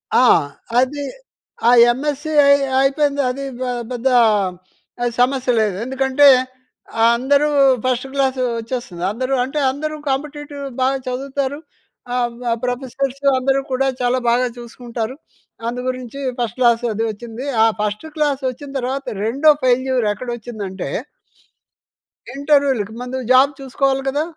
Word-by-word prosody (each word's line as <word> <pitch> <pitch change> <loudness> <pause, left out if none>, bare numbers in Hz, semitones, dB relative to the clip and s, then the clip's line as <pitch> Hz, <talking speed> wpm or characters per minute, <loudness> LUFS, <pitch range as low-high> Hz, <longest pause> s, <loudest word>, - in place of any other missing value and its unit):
ఆ! 255 - +6 0.5
అది 285 +3 0 0.6
ఆ - - +7 0.2
ఎంఎస్‌సీ 295 +4 -3
అయ్ 280 0 +5 0.2
అయిపోయింది. 280 +1 +2
అది 275 +2 -4 0.3
ఆహ్, 240 -1 -3
పెద్దా 250 +1 0 0.9
ఆహ్, 240 - 0
సమస్య 255 0 +2
లేదు. 210 -3 0
ఎందుకంటే, 265 +2 +3 0.9
అందరూ 280 +5 +2 0.4
ఫస్ట్ 255 +1 0
క్లాసు 265 -2 0 0.2
వచ్చేస్తుంది. 230 -7 -5
అందరూ 255 +4 -2
అంటే, 275 +4 -3
అందరూ 305 +3 -4
కాంపిటీటివ్ 290 +1 -4 0.2
బాగ 265 +1 +3
చదువుతారు. 275 +2 -3 0.6
ఆహ్, 240 -1 +1
వ 235 - +1
ప్రొఫెసర్సు, 265 +2 -3
అందరూ 270 +1 +1
కూడా 270 +1 +1
చాలా 245 +1 +1
బాగా 250 +1 +2
చూసుకుంటారు. 240 0 -6 0.5
అందు 245 +1 -3
గురించి 255 +1 -6 0.2
ఫస్ట్ 240 +1 -2
క్లాసు 240 -1 +3
అదీ 225 - -2
వచ్చింది. 235 +4 -8 0.2
ఆ - - +6 0.2
ఫస్టు 210 +8 -3
క్లాసొచ్చిన 275 -2 -2
తర్వాత, 265 +2 -3 0.2
రెండో 280 +7 +4
ఫెయిల్యూర్ 255 -2 +2
ఎక్కడొచ్చిందంటే... 215 - -6 1.5
ఇంటర్వ్యూలకి. 275 -7 +1
ముందు 250 +1 -4
జాబ్ 265 +3 +6
చూసుకోవాలి 270 0 0
కదా! 290 +3 0
260 Hz, 120 wpm, -19 LUFS, 245-275 Hz, 1.5 s, ఆ